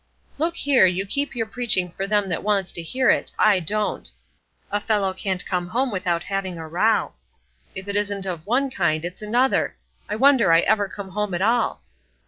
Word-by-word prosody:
"Look 335 Hz, +2 st, 0 dB
here, 275 Hz, -, +4 dB
you 185 Hz, +2 st, 0 dB
keep 280 Hz, +7 st, -2 dB
your 225 Hz, -2 st, -1 dB
preaching 220 Hz, -6 st, -1 dB
for 195 Hz, +3 st, -4 dB
them 205 Hz, -1 st, +1 dB
that 165 Hz, -, -2 dB
wants 200 Hz, -3 st, 0 dB
to 170 Hz, -, -3 dB
hear 255 Hz, +10 st, +2 dB
it; -, -, -1 dB
I 210 Hz, -3 st, +4 dB
don't. 210 Hz, +5 st, -1 dB, 0.6 s
A 205 Hz, +1 st, 0 dB
fellow 205 Hz, -3 st, 0 dB
can't 190 Hz, -1 st, -2 dB
come 180 Hz, -2 st, -2 dB
home 250 Hz, +6 st, -1 dB
without 180 Hz, -3 st, -1 dB
having 195 Hz, -3 st, -3 dB
a 160 Hz, -1 st, -7 dB
row; 185 Hz, +8 st, +1 dB, 0.6 s
if 190 Hz, +1 st, -5 dB
it 200 Hz, -, -3 dB
isn't 205 Hz, -1 st, 0 dB
of 175 Hz, -2 st, -5 dB
one 265 Hz, +4 st, +1 dB
kind, 170 Hz, -6 st, 0 dB
it's 180 Hz, +3 st, -7 dB
another. 240 Hz, +5 st, +1 dB, 0.3 s
I 210 Hz, -, -1 dB
wonder 260 Hz, -5 st, +4 dB
I 165 Hz, 0 st, +6 dB
ever 205 Hz, 0 st, +2 dB
come 200 Hz, -1 st, -8 dB
home 205 Hz, -1 st, -2 dB
at 180 Hz, -, -1 dB
all." 230 Hz, -, +1 dB
200 Hz, 195 wpm, -23 LUFS, 180-225 Hz, 0.6 s, I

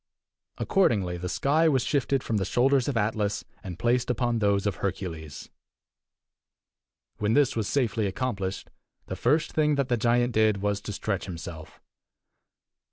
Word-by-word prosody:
Accordingly, 100 Hz, -, +1 dB
the 90 Hz, +1 st, -4 dB
sky 155 Hz, -, +2 dB
was 135 Hz, -5 st, +2 dB
shifted 135 Hz, -1 st, 0 dB
from 110 Hz, -, -1 dB
the 100 Hz, -, 0 dB
shoulders 130 Hz, +6 st, +2 dB
of 140 Hz, -4 st, -1 dB
Atlas, 105 Hz, -1 st, -1 dB, 0.2 s
and 90 Hz, -3 st, -7 dB
placed 120 Hz, +6 st, +1 dB
upon 120 Hz, -1 st, 0 dB
those 100 Hz, -1 st, +1 dB
of 100 Hz, -3 st, -1 dB
Hercules. 85 Hz, -6 st, -5 dB, 1.7 s
When 105 Hz, +1 st, +1 dB
this 145 Hz, -3 st, +3 dB
was 110 Hz, -3 st, -1 dB
safely 115 Hz, -6 st, 0 dB
accomplished, 100 Hz, -3 st, -3 dB, 0.3 s
the -, -, -5 dB
first 150 Hz, +6 st, +1 dB
thing 150 Hz, -1 st, +2 dB
that 140 Hz, -2 st, -1 dB
the 120 Hz, -, +2 dB
giant 120 Hz, +1 st, +2 dB
did 110 Hz, -2 st, +3 dB
was 105 Hz, -1 st, 0 dB
to -, -, -6 dB
stretch 100 Hz, -1 st, -2 dB
himself. 85 Hz, -3 st, -8 dB
110 Hz, 150 wpm, -27 LUFS, 100-130 Hz, 1.7 s, this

